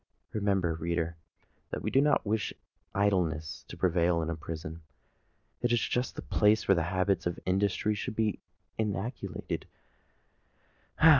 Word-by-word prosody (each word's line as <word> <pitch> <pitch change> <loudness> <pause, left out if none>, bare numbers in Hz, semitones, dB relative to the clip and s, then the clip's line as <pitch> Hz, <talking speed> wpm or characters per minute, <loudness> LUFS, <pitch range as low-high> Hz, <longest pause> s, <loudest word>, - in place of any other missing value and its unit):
Remember, 95 -5 +2
reader, 85 +1 -1 0.5
that - - -4
we - - -1
do 135 - +5
not 145 -4 +3
wish 105 +1 0 0.4
idleness 80 -6 +1
to - - -9
prevail 85 -1 +3
in 80 - -1
a - - -2
prison. 80 +1 -6 0.8
It 120 - +2
is 120 - +4
just 125 +3 -1
the - - -5
place 105 +1 +3
where 95 -4 +5
habits 95 +3 +1
of 85 - -3
industry 100 +3 +2
should 105 +1 -4
be 110 -2 +1 0.4
inculcated. 110 +3 -2
95 Hz, 135 wpm, -30 LUFS, 85-105 Hz, 0.8 s, do